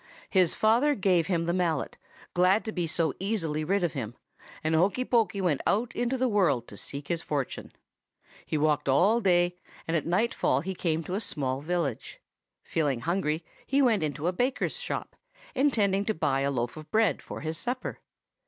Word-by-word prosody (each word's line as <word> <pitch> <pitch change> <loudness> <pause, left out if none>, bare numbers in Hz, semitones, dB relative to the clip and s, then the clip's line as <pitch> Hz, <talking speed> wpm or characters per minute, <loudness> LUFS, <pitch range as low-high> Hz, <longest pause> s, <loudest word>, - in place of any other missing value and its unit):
"His 185 -4 +4
father 240 +7 +3
gave 180 - +2
him 170 -3 0
the 170 - 0
mallet, 170 -5 0 0.4
glad 185 +4 +3
to 220 - -3
be 175 -5 -2
so 160 -2 0
easily 170 -7 -1
rid 190 +4 +1
of 170 - 0
him, 120 -5 -5 0.5
and 155 +1 +1
Hokey 195 +10 +2
Pokey 225 -5 +1
went 170 -7 +1
out 225 +4 +1
into 245 +2 0
the 255 0 +2
world 170 - +2
to - - -10
seek 140 +7 -6
his 170 -1 0
fortune. 145 -6 -3 0.7
He 155 - -2
walked 150 -1 +1
all 200 - +4
day, 180 -2 +2 0.3
and 165 - 0
at 160 - 0
nightfall 190 -3 +1
he 190 +4 -4
came 165 -3 -1
to 180 - -5
a 195 - 0
small 135 - -2
village. 160 -6 -2 0.4
Feeling 145 -7 0
hungry, 165 0 -1 0.2
he 275 - +2
went 235 -8 +4
into 150 0 -2
a 180 - +1
baker's 255 - -1
shop, - - -4 0.4
intending 205 -8 +2
to 220 - 0
buy 135 -3 +1
a 140 +1 +1
loaf 120 0 -2
of 155 0 -10
bread 220 -2 +2
for - - -8
his 160 0 -2
supper. 250 +1 -3
175 Hz, 185 wpm, -28 LUFS, 155-210 Hz, 0.7 s, His